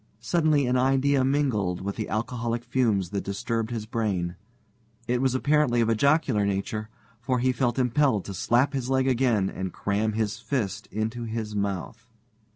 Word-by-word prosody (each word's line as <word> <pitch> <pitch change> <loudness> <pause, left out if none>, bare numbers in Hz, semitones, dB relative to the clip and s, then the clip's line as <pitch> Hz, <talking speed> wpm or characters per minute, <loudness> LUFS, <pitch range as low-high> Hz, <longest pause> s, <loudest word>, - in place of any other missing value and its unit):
Suddenly 150 +4 +2
an 125 +1 +2
idea 135 +1 +3
mingled 130 -10 0
with 100 +1 -3
the 110 - -4
alcoholic 115 +1 -2
fumes 110 -7 +1
that 100 -1 -2
disturbed 110 +3 -2
his 115 -3 -4
brain. 100 -6 -2 0.7
It 125 0 +1
was 130 -1 +1
apparently 140 -3 +2
of 115 -1 +2
a 115 - +3
jocular 140 -4 +2
nature, 100 +2 -2 0.3
for 125 +2 0
he 130 +1 +2
felt 125 -1 0
impelled 125 -4 +2
to 100 - -6
slap 120 - +2
his 130 -2 -2
leg 130 0 +2
again 120 -6 +2
and 95 -1 -4
cram 105 +4 -1
his 110 -1 -1
fist 120 -9 -3
into 110 +3 -3
his 110 -2 -4
mouth. 100 +4 -3
115 Hz, 165 wpm, -26 LUFS, 105-130 Hz, 0.7 s, idea